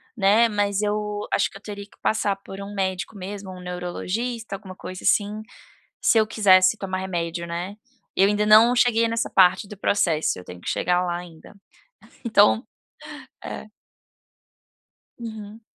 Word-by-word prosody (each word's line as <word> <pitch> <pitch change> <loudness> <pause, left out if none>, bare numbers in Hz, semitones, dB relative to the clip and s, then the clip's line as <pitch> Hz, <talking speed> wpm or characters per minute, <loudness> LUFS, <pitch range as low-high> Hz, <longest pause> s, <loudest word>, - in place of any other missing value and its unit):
né, 215 +3 +4
mas 205 -1 0
eu 210 0 -2
acho - - +2
que - - -12
eu - - -18
teria 205 -1 -8
que 205 - -24
passar 205 -2 +1
por 195 0 -10
um 200 +1 -7
médico 190 +1 -3
mesmo, 195 0 -7
um 185 -1 -10
neurologista, 190 +6 -4
alguma 190 -1 -10
coisa 185 0 -8
assim, 210 +1 +1 0.6
se 225 - +4
eu 220 - +3
quisesse 195 -2 +5
tomar 190 -3 -4
remédio, 170 -2 -3
né. 175 +4 -5 0.4
Eu 195 +1 +5
ainda 210 0 +1
não 225 +3 +7
cheguei 230 -2 +3
nessa 230 0 -1
parte 185 +2 +4
do 210 - -10
processo, 175 - +1
eu 90 - -10
tenho 90 0 -10
que - - -8
chegar 180 +1 +1
lá 175 -1 -2
ainda. 175 -1 -11 0.7
Então 220 0 +4 0.8
é. - - -6 1.5
Uhum. 220 -2 -8
200 Hz, 155 wpm, -23 LUFS, 185-215 Hz, 1.5 s, não